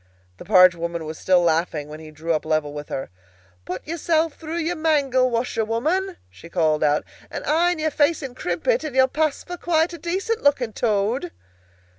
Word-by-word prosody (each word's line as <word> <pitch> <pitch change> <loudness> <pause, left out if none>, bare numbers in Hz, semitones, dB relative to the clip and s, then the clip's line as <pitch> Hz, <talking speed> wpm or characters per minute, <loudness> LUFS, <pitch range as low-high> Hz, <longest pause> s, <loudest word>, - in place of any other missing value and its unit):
The - - -11
barge 185 -1 +7
woman 170 -1 -4
was 155 0 -7
still 185 -1 +3
laughing 160 -3 0
when 155 +1 -9
he 160 -1 -11
drew 160 +2 -3
up 155 - -1
level 155 -2 -1
with 150 0 -7
her. 135 - -5 0.5
"Put 185 - -6
yourself 325 0 0
through 320 +2 -6
your 340 +1 -1
mangle, 280 -6 +2
washerwoman," 245 - -1
she 170 - -14
called 155 -3 +1
out, 150 0 +2 0.3
"and - - -6
iron 345 +3 +2
your 315 0 -1
face 295 +2 +2
and 255 -2 -6
crimp - - -4
it, - - +3
and 300 -4 -5
you'll 260 0 +5
pass 305 +2 -1
for 355 0 -7
quite 335 0 +1
a 340 - -8
decent 385 +8 -2
looking 260 -6 +2
Toad!" 210 -3 0
255 Hz, 190 wpm, -23 LUFS, -, 0.5 s, barge